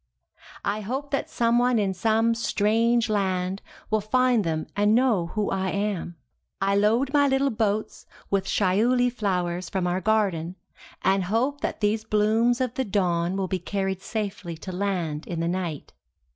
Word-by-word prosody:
I 205 +2 -1
hope 265 +7 -4
that 275 - -1
someone 240 +1 +2
in 200 -3 +1
some 225 +4 +2
strange 230 +1 +2
land 190 -2 -1 0.3
will 215 0 +2
find 245 +1 +2
them 160 -2 -2
and 205 +2 +3
know 230 -9 +2
who 210 -1 0
I 190 0 -1
am. 200 -3 -2 0.4
I 195 +1 +1
load 230 +7 +2
my 285 -1 +4
little 270 0 +2
boats 215 -1 -2 0.2
with 195 -1 +1
shiuli 235 +7 +2
flowers 180 -5 -2
from 190 -2 -1
our 180 +1 0
garden, 190 -6 0 0.5
and 190 0 +2
hope 250 +9 0
that - - -3
these 215 +1 +1
blooms 220 +3 +2
of 255 -2 -1
the 265 - -1
dawn 180 -4 0
will 190 -1 -1
be 185 0 -2
carried 190 +1 -2
safely 200 -6 -4
to 185 +3 -7
land 180 -5 -2
in 170 -2 -4
the 165 - 0
night. 175 -4 -3
205 Hz, 160 wpm, -25 LUFS, 185-230 Hz, 0.5 s, my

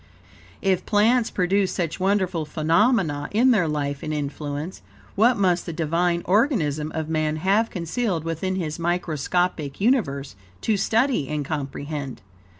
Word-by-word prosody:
If 190 -2 +2
plants 225 +3 +3
produce 190 +1 +1
such 170 -2 -2
wonderful 185 -3 +1
phenomena 160 - +1
in 245 +5 +4
their 190 -8 +3
life 145 -2 -2
and 155 - -4
influence, 145 +2 -4 0.3
what 235 +5 +4
must 180 -3 +1
the 170 - -3
Divine 170 +2 0
organism 170 - +1
of 160 -1 -2
man 155 -1 0
have 195 +8 +2
concealed 180 0 -2
within 165 +3 -2
his 165 -4 -3
microscopic 170 -2 -1
universe, 145 - +1 0.3
to 220 - +1
study 225 - +1
and 150 -1 -2
comprehend? 140 - -5
170 Hz, 135 wpm, -24 LUFS, 150-200 Hz, 0.3 s, in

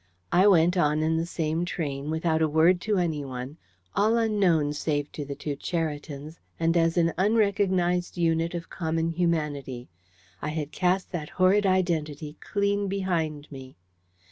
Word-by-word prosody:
I 185 +3 +5
went, 175 -1 +4
on 150 -2 +2
in 160 +1 +1
the 165 +1 -1
same 160 0 -1
train, 145 -5 -3
without 160 0 0
a 160 - +4
word 165 +4 +4
to 215 -2 0
anyone, 145 -5 -3 0.4
all 220 +3 +3
unknown 190 -10 +2
save 145 -1 -2
to 150 - -5
the 140 0 -6
two 145 0 -4
Cheritons, 150 -1 -4 0.2
and 165 +1 +2
as 165 0 +2
an 165 -1 +3
unrecognised 190 -4 +1
unit 165 0 +1
of 170 -1 -5
common 165 -1 -1
humanity. 150 -7 -2 0.5
I 150 - -2
had 150 -1 -4
cast 185 +1 0
that 160 -5 -4
horrid 195 +2 +3
identity 155 -5 -1
clean 200 0 0
behind 165 -7 -2
me. 130 -1 -10
165 Hz, 150 wpm, -26 LUFS, 150-180 Hz, 0.5 s, I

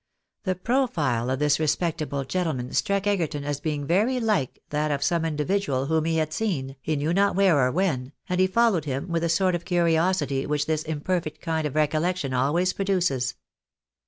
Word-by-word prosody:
The 185 -1 0
profile 170 - 0
of 130 - 0
this 145 +1 +2
respectable 155 -2 -1
gentleman 135 -4 -2
struck 200 -1 +1
Egerton 165 -8 0
as 145 -1 -2
being 145 -1 -2
very 215 - +2
like 215 - 0
that 150 +1 0
of 140 -1 -1
some 170 -2 +1
individual 150 -3 0
whom 160 +1 +1
he 165 0 +1
had 155 -1 -1
seen, 140 -12 -2
he 155 - -1
knew 150 +3 0
not 200 +1 +2
where 190 -6 +4
or 130 -1 +3
when, 145 -7 -1 0.2
and 180 -1 -1
he 185 - +5
followed 200 -5 +2
him 140 +4 -3
with 165 -1 0
the 170 - 0
sort 185 +2 +2
of 175 -1 -2
curiosity 170 -5 +1
which 150 0 0
this 155 -1 0
imperfect 155 +1 -3
kind 160 -2 -1
of 145 - -8
recollection 155 0 0
always 150 +9 +1
produces. 180 -10 0
160 Hz, 185 wpm, -25 LUFS, 145-185 Hz, 0.2 s, he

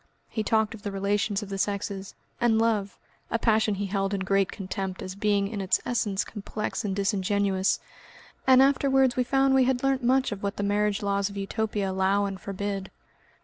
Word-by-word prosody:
He 220 - -2
talked 220 0 +1
of 220 - -10
the 205 - -4
relations 200 +1 0
of 200 - -9
the 195 0 -4
sexes, 200 -1 -3 0.2
and 235 -2 +3
love 220 -3 0 0.3
a - - +1
passion 220 -2 +2
he 200 +1 -2
held 195 0 -1
in 195 - -3
great 195 0 +1
contempt 190 -1 -5
as 185 - -5
being 200 0 +1
in 205 -1 -4
its 190 - +2
essence 210 -5 0
complex 210 0 -4
and 195 -3 -2
disingenuous 200 -1 +1 0.7
and 260 0 +7
afterwards 270 -2 +3
we 255 - +2
found 270 +1 +2
we 265 -1 +5
had 255 0 0
learnt 270 -1 +1
much 260 +1 +2
of 200 -1 -5
what 200 0 -3
the 205 - -2
marriage 205 0 +1
laws 200 0 0
of 200 - -9
Utopia 205 0 -2
allow 190 +2 +2
and 195 -1 -5
forbid. 200 -1 -4
205 Hz, 190 wpm, -27 LUFS, 195-225 Hz, 0.7 s, and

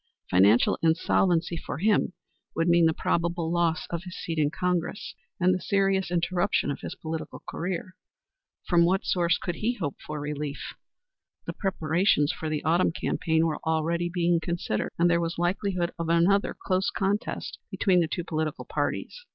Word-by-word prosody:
Financial 100 +6 +5
insolvency 165 +1 +2
for - - -5
him 205 0 +2 0.4
would 165 - +1
mean 170 -1 +5
the - - +3
probable 170 -1 0
loss 170 0 +1
of 170 -1 -2
his 180 -1 -8
seat 165 -2 -3
in 145 -1 +3
Congress, 180 +3 -2 0.3
and 185 +1 +4
the 185 - -2
serious 195 -2 +1
interruption 175 -1 +1
of - - -5
his - - -6
political 160 0 -6
career. 185 +1 -4 0.7
From 175 -2 +4
what 185 +3 +2
source 175 -1 +2
could 175 -2 -4
he 240 +3 0
hope 145 - -4
for 150 0 -6
relief? 145 0 -4 0.7
The - - -4
preparations 165 -4 +1
for 160 - -4
the 155 -1 -2
autumn 165 +3 +3
campaign 160 -1 0
were 160 -2 -1
already 165 +2 0
being 175 -1 +2
considered, 170 - -2
and 170 - +4
there 170 0 +3
was 165 0 -3
likelihood 180 0 0
of 165 -1 -2
another 175 +4 +3
close 185 0 0
contest 200 +2 -2
between 185 -4 +2
the 170 - +2
two 175 - -3
political 155 -2 -3
parties. - - -3
170 Hz, 165 wpm, -27 LUFS, 160-185 Hz, 0.7 s, Financial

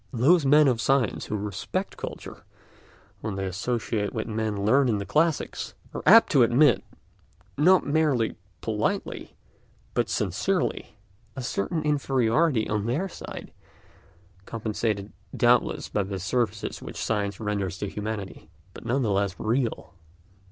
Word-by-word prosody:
Those 140 +6 +4
men 150 +1 +6
of 120 -3 +1
science 135 -4 +1
who 105 - -2
respect 100 -2 -4
culture, - - -8 0.8
when 105 -3 -4
they 95 0 -3
associate 105 +2 -2
with 110 - -2
men 110 -2 -2
learned 130 +4 +4
in 110 - +1
the 100 - -4
classics, 160 - 0 0.2
are - - -4
apt 230 - +8
to 140 - +5
admit, 120 +2 +4 0.7
not 180 +6 +5
merely 145 -6 +1 0.3
politely, 110 -1 -2 0.6
but - - 0
sincerely, - - -1 0.4
a 130 - -5
certain 125 - -2
inferiority 135 -2 +2
on 105 0 -1
their 150 +11 0
side, - - -9 0.9
compensated 110 -2 -2 0.3
doubtless - - +3
by 105 - -1
the 95 0 -4
services 105 +2 -2
which - - -8
science 100 -3 -1
renders 100 -3 -2
to 100 - -3
humanity, 105 -1 -6 0.2
but - - -11
none 130 +3 0
the 110 - 0
less 100 -1 0
real. 115 -4 -1
115 Hz, 135 wpm, -26 LUFS, 105-135 Hz, 0.9 s, apt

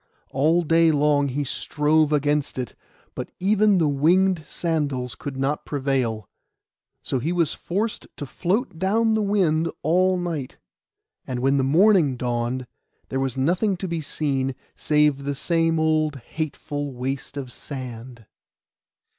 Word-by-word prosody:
All 160 +6 +3
day 165 +1 +4
long 145 -1 +3
he 140 +2 -2
strove 150 +2 +1
against 145 -1 +1
it; 125 -4 -4 0.4
but - - -5
even 205 +1 +3
the 165 -3 +3
winged 170 +5 +3
sandals 145 -7 -2
could 140 -2 -7
not 135 +3 -1
prevail. 130 -7 -1 0.8
So 130 - -1
he 155 +7 -1
was 170 -4 +1
forced 210 +5 -3
to 145 - -5
float 180 - -2
down 220 +4 +2
the 220 - +2
wind 175 -6 +2
all 185 +4 +3
night; 165 -7 -4 0.7
and 130 -2 -3
when 135 +2 +2
the 135 - +2
morning 160 -1 +4
dawned 120 +1 -2 0.4
there 135 - -1
was 135 -1 -2
nothing 180 +8 +1
to 190 - -4
be 170 -2 -2
seen, 135 -3 -1 0.2
save 150 -2 +2
the 140 0 -2
same 165 +2 +1
old 155 -1 +2
hateful 145 0 -5
waste 135 +3 -4
of 130 -3 -5
sand. 125 -4 -8
150 Hz, 140 wpm, -24 LUFS, 135-170 Hz, 0.8 s, day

